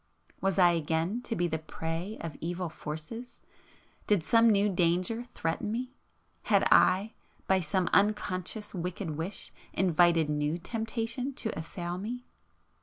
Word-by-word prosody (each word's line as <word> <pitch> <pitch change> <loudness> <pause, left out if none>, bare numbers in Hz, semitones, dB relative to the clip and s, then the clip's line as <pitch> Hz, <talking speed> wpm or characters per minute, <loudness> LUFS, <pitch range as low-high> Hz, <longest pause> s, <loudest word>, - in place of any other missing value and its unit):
Was 195 -2 +1
I 175 -2 +7
again 165 +7 0
to 230 - -2
be 175 -3 +1
the 160 -1 -2
prey 165 +6 -4
of 160 -3 -5
evil 175 +1 -2
forces?——did 195 +3 -5
some 230 +5 +5
new 205 -1 +4
danger 180 +2 +1
[p 240 - -5
486] - - -14
threaten 165 +6 -1
me?—had 250 +3 -2
I, 200 +4 +5 0.3
by 190 0 +3
some 180 +3 0
unconscious 205 0 +1
wicked 180 -1 -3
wish 165 +6 -5 0.2
invited 170 -3 +4
new 150 +2 0
temptation 230 +6 -3
to 220 - -3
assail 175 +2 -4
me? 245 +5 -5
185 Hz, 135 wpm, -30 LUFS, 165-220 Hz, 0.3 s, I